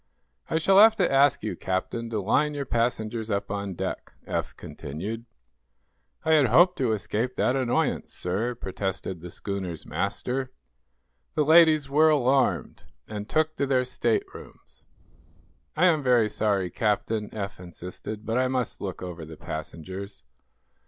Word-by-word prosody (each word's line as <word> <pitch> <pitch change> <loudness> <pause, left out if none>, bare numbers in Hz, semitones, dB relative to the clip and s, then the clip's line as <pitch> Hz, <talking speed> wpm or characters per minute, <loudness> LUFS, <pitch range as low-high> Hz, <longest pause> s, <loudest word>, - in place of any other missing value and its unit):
"I 160 - +1
shall 190 +4 +5
have 220 +1 +8
to 190 -4 +1
ask 140 -2 +4
you, 110 - -2
Captain, 105 +5 -3
to 110 -2 -2
line 145 +9 +1
your 140 -1 -3
passengers 115 -2 -1
up 100 -2 -2
on 100 -2 -3
deck," - - -5
Eph - - -3
continued. 100 +11 -6 1.0
"I 160 - +2
had 150 -4 +5
hoped 175 +10 +5
to 125 -4 +2
escape 110 +4 -2
that 130 - +1
annoyance, 130 -3 0
sir," 105 +7 -2
protested 95 -4 -4
the 90 - -8
schooner's 95 -3 -5
master. 130 +1 -2 0.8
"The 150 - +2
ladies 155 -2 +6
were 155 +3 +4
alarmed, 135 -3 +1 0.2
and 105 0 -6
took 155 0 +1
to 140 - 0
their 130 -2 +2
staterooms." 120 -2 -4 0.9
"I 175 - +4
am 165 -4 +4
very 120 -5 +3
sorry, 100 -4 0
Captain," 105 +1 -1
Eph 100 -3 -5
insisted, 90 +4 -8
"but 115 +2 0
I 130 - +2
must 125 -3 -2
look 95 -2 -5
over 90 -2 -6
the 80 0 -10
passengers." 95 +6 -7
115 Hz, 145 wpm, -26 LUFS, 100-135 Hz, 1.0 s, have